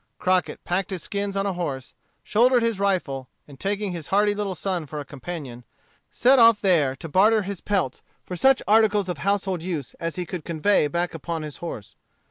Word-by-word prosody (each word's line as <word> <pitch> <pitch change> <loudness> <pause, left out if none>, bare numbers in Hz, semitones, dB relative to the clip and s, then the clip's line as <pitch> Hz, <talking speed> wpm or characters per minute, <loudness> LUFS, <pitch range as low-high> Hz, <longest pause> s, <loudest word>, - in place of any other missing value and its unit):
Crockett 185 0 0
packed 185 +2 -1
his 185 -4 -4
skins 200 -1 -3
on 195 - 0
a 200 - 0
horse, 145 -7 -4 0.3
shouldered 240 +2 +3
his 230 -4 0
rifle, 155 -10 -1 0.2
and 140 -2 -14
taking 205 0 -2
his 170 -4 -6
hardy 205 +1 +3
little 205 -2 -3
son 175 -2 -3
for 150 +1 -6
a 145 - -6
companion, 135 -4 -7 0.5
set 260 +2 +4
off 230 -2 +7
there 155 -9 +2
to 165 - -8
barter 210 +6 +4
his 195 -1 -5
peltries 185 -11 -1 0.2
for 180 - -5
such 265 +8 +4
articles 210 -3 +3
of 175 -5 -3
household 195 -1 0
use 165 -7 -4
as 165 -2 -3
he 180 - -3
could 175 -1 -6
convey 170 +1 +2
back 175 +4 -2
upon 165 0 -4
his 150 -2 -7
horse. 115 -12 -7
185 Hz, 195 wpm, -24 LUFS, 155-205 Hz, 0.5 s, off